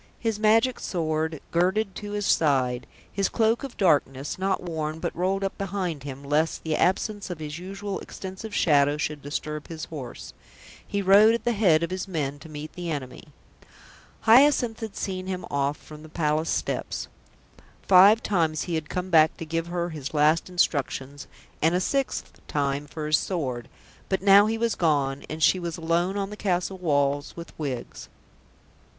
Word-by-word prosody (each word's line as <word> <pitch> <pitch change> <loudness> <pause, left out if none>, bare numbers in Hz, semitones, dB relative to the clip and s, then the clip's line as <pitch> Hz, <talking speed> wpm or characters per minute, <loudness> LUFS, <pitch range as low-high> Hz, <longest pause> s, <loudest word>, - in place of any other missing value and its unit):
His 225 -3 -2
magic 225 +4 +3
sword 160 -2 -2
girded 190 +4 +1
to 205 -1 -6
his 205 -1 -2
side, 130 -7 +2 0.3
his 195 -1 +1
cloak 225 +2 +1
of 270 -3 -7
darkness, 145 -5 +1
not 190 0 0
worn 160 -2 -3
but - - -4
rolled 190 +3 0
up 195 - -2
behind 185 -6 -3
him, 140 0 -8
lest 150 +3 0
the 160 -1 -1
absence 205 +2 0
of 180 - -4
his 150 +1 -6
usual 195 +2 -5
extensive 190 +3 -8
shadow 145 -2 +3
should 150 -1 -3
disturb 150 +1 -5
his 160 -1 -6
horse, 135 -7 -8 0.5
he 200 -1 -2
rode 205 +4 +7
at 235 - -5
the 240 - +1
head 185 -8 +3
of 170 - -2
his 185 +1 -3
men 145 -6 -3
to 160 - -12
meet 155 0 -8
the 175 -1 -5
enemy. 140 -5 -5 1.0
Hyacinth 245 -1 +5
had 220 -3 -6
seen 185 -1 -4
him 185 -1 -4
off 140 +1 0
from 155 -1 -13
the 155 - -12
Palace 155 0 0
steps. - - -2 0.8
Five 200 +4 +7
times 165 -6 +1
he 175 - -4
had 160 -1 -2
come 185 +1 -3
back 160 -1 +5
to 165 - -6
give 165 +1 -2
her 175 0 -2
his 150 -1 -6
last 155 +4 +3
instructions, 145 -5 -1 0.3
and 165 +3 +3
a - - +2
sixth 275 +8 -2
time 140 0 -1
for 155 +1 -6
his 155 0 +3
sword, 130 - -3 0.4
but 190 -1 -1
now 200 +1 +7
he 225 +1 -1
was 230 -1 +1
gone, 140 -4 0
and 155 0 -3
she 185 - +5
was 170 -2 -4
alone 170 +4 0
on 200 0 -2
the - - -6
castle 185 -1 -1
walls 145 -4 0
with 170 0 -9
Wiggs. 135 -5 -5
170 Hz, 175 wpm, -26 LUFS, 150-195 Hz, 1.0 s, rode